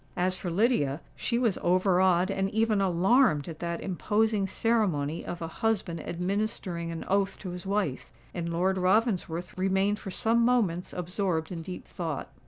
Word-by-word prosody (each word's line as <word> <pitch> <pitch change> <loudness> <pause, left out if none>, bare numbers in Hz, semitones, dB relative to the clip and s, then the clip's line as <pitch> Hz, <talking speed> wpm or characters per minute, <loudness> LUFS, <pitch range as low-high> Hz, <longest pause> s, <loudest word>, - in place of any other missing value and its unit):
As 185 +1 +2
for 185 - -4
Lydia—she 180 - 0
was 235 -6 +1
overawed 185 0 +3
and 195 0 0
even 220 -1 +1
alarmed 190 - +3
at 165 -2 -7
that 170 -1 -3
imposing 210 +2 +1
ceremony 185 -9 0
of 175 -1 -5
a - - -3
husband 190 -2 -1
administering 180 -1 -2
an 165 - -6
oath 195 0 +1
to 185 - -6
his 180 +1 -7
wife; 195 -10 -1 0.2
and 170 -1 -3
Lord 185 +3 +1
Ravensworth 185 -3 +1
remained 195 +2 +1
for 195 - -7
some 230 +4 +2
moments 210 -8 +1
absorbed 180 -2 -2
in 170 -2 -4
deep 180 +2 -7
thought. 160 -5 -4
185 Hz, 155 wpm, -28 LUFS, 170-210 Hz, 0.2 s, overawed